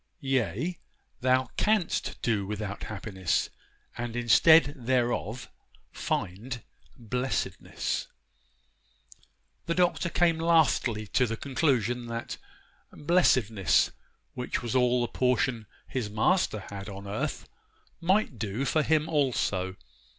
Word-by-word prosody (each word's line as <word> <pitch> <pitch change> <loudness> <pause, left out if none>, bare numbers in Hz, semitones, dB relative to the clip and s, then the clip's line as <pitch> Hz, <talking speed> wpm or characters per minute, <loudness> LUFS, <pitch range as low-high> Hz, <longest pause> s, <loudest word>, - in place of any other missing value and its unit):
Yea, 135 - -1 0.4
thou 130 0 +2
canst 210 -5 0
do 110 -4 +1
without 105 -1 -4
happiness, 95 -4 -2 0.4
and 120 -1 -4
instead 135 +6 +6
thereof 120 -2 -1 0.4
find 115 +7 -3 0.3
blessedness.' 125 +2 -2 1.6
The 170 - 0
Doctor 175 -1 +2
came 170 -1 +2
lastly 155 -9 +2
to 125 +4 +1
the 115 0 -3
conclusion 125 -4 0
that 115 0 -5 0.5
'blessedness,' 130 - +3 0.4
which 125 0 -3
was 120 +1 -3
all 125 -1 +3
the 120 - 0
portion 125 -2 0 0.2
his 125 -5 -3
Master 110 - +1
had 100 +1 -6
on 100 0 -8
earth, 100 +2 -3 0.5
might 180 - +1
do 110 +5 -2
for 155 - +2
him 155 0 +2
also. 120 - 0
125 Hz, 105 wpm, -28 LUFS, 110-145 Hz, 1.6 s, instead